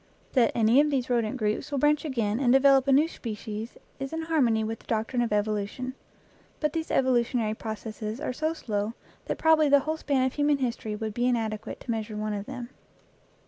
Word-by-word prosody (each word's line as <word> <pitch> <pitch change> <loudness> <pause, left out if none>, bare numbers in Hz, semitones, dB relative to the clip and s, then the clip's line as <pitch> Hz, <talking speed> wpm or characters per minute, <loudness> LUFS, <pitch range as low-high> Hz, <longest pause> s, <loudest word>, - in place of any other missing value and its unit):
That 245 -4 +4
any 230 +4 +5
of 300 - +1
these 260 -3 -1
rodent 235 0 +1
groups 215 +5 -1
will 285 - -2
branch 295 +3 +2
again 230 -6 -1
and 255 -3 +3
develop 270 0 +5
a - - +4
new 290 +4 +5
species 220 -5 -6 0.2
is 270 0 -4
in 325 0 -3
harmony 255 -9 +2
with 225 +1 -3
the - - -22
doctrine 225 +2 0
of 235 - -1
evolution. 210 +4 -1 0.7
But 300 -1 0
these 325 -1 -3
evolutionary 240 -4 +2
proc 220 0 -6
esses 215 +1 -5
are 255 - -3
so 315 +4 -1
slow 210 -4 -3 0.3
that - - -2
probably 315 -2 +4
the 285 0 +6
whole 315 +3 -2
span 275 -4 +1
of 260 - -1
human 290 0 +2
history 235 -5 -2
would 215 0 -4
be 245 +3 +1
inadequate 220 -3 -2
to 240 - -4
measure 220 -1 -3
one 215 0 -2
of 205 0 -5
them. 250 -3 -6
245 Hz, 205 wpm, -27 LUFS, 220-275 Hz, 0.7 s, the